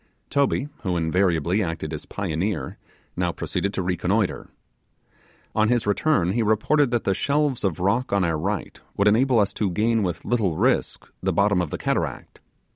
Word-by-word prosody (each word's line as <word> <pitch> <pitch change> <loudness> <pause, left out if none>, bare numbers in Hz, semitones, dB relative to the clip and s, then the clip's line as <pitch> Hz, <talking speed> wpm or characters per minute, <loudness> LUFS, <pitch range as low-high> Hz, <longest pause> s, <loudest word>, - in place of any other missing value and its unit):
Toby, 140 0 +1
who 90 -4 -1
invariably 85 +2 +1
acted 80 -3 -3
as 75 - -6
pioneer, 100 +1 -3 0.4
now - - 0
proceeded 100 - -2
to 95 - -1
reconnoitre. 90 +3 -1 1.0
On 110 0 +2
his 120 -2 +1
return, 105 - +2
he 115 +4 0
reported 115 +7 +2
that 120 -1 0
the 95 - +1
shelves 140 +3 0
of 95 -6 -1
rock 115 +8 0
on 100 -1 +2
our 80 -3 0
right 100 +3 -3 0.2
would 100 - +3
enable 120 +4 +4
us 100 -1 +1
to 105 - -1
gain 110 +5 +1
with 90 -3 -3
little 100 -10 0
risk - - 0
the - - 0
bottom 100 -2 +2
of 85 - -3
the - - -4
cataract. - - -3
100 Hz, 170 wpm, -24 LUFS, 90-115 Hz, 1.0 s, enable